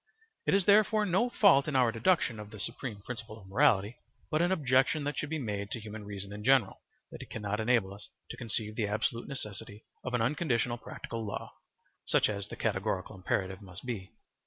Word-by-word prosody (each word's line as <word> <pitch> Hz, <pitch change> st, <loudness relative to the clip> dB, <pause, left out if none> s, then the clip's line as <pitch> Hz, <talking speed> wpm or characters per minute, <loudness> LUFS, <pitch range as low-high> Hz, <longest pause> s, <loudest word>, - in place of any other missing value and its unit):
It -, -, +4 dB
is 195 Hz, -2 st, +2 dB
therefore 215 Hz, +1 st, +5 dB
no 205 Hz, +6 st, +2 dB
fault 195 Hz, -, +5 dB
in 150 Hz, -, -2 dB
our 125 Hz, -3 st, +4 dB
deduction 120 Hz, -1 st, +2 dB
of 105 Hz, -1 st, -8 dB
the 110 Hz, -, -10 dB
supreme 105 Hz, 0 st, -4 dB
principle 115 Hz, -2 st, -7 dB
of 95 Hz, -, -15 dB
morality, 100 Hz, +3 st, +3 dB, 0.3 s
but 155 Hz, -, +2 dB
an 175 Hz, +2 st, +2 dB
objection 140 Hz, -2 st, +3 dB
that 145 Hz, +1 st, -2 dB
should 150 Hz, -, -3 dB
be 160 Hz, -, -1 dB
made 105 Hz, -7 st, -3 dB
to 115 Hz, -, -4 dB
human 105 Hz, -1 st, -8 dB
reason 100 Hz, -1 st, -6 dB
in 105 Hz, 0 st, -7 dB
general, 130 Hz, -5 st, +3 dB, 0.3 s
that -, -, -8 dB
it -, -, -10 dB
cannot 105 Hz, -1 st, -3 dB
enable 110 Hz, -4 st, +2 dB
us 100 Hz, +1 st, -12 dB, 0.2 s
to -, -, -6 dB
conceive 110 Hz, -2 st, -3 dB
the 110 Hz, -3 st, 0 dB
absolute 110 Hz, +3 st, -1 dB
necessity 105 Hz, -5 st, -6 dB, 0.2 s
of 125 Hz, -1 st, -2 dB
an 120 Hz, -, +1 dB
unconditional 125 Hz, -3 st, 0 dB
practical 115 Hz, 0 st, -6 dB
law 105 Hz, -, -5 dB, 0.5 s
(such -, -, +3 dB
as 100 Hz, -1 st, -3 dB
the -, -, -7 dB
categorical 95 Hz, -4 st, -1 dB
imperative 95 Hz, +1 st, -2 dB
must 95 Hz, +2 st, -9 dB
be). 105 Hz, -7 st, -4 dB
115 Hz, 200 wpm, -31 LUFS, 105-135 Hz, 0.5 s, therefore